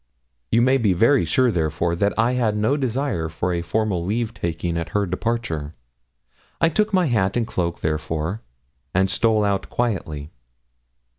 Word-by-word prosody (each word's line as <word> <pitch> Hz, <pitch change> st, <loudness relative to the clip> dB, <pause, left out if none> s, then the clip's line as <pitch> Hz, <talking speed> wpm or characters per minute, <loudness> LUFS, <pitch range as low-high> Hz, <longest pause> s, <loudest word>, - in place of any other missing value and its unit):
You 115 Hz, +1 st, +3 dB
may 130 Hz, +2 st, +4 dB
be 105 Hz, -6 st, +3 dB
very 115 Hz, +10 st, +4 dB
sure, 130 Hz, -3 st, +3 dB
therefore, 85 Hz, -1 st, 0 dB
that 100 Hz, +4 st, 0 dB
I 115 Hz, +2 st, +3 dB
had 115 Hz, -4 st, +1 dB
no 110 Hz, +7 st, +2 dB
desire 130 Hz, -, -1 dB
for 90 Hz, +3 st, -2 dB
a 85 Hz, -, -1 dB
formal 100 Hz, -1 st, -1 dB
leave 110 Hz, +4 st, -1 dB
taking 85 Hz, -3 st, -3 dB
at 85 Hz, -1 st, -3 dB
her 100 Hz, -, +1 dB
departure. 90 Hz, -6 st, -3 dB, 0.8 s
I 165 Hz, -, +4 dB
took 210 Hz, +6 st, +1 dB
my 185 Hz, -3 st, +3 dB
hat 110 Hz, -7 st, +1 dB
and 120 Hz, -, +1 dB
cloak, 85 Hz, -5 st, -2 dB
therefore, 80 Hz, +5 st, -2 dB, 0.5 s
and 95 Hz, +1 st, +3 dB
stole 110 Hz, +1 st, +2 dB
out 100 Hz, -1 st, -1 dB
quietly. 80 Hz, -10 st, -2 dB
100 Hz, 160 wpm, -22 LUFS, 85-120 Hz, 0.8 s, may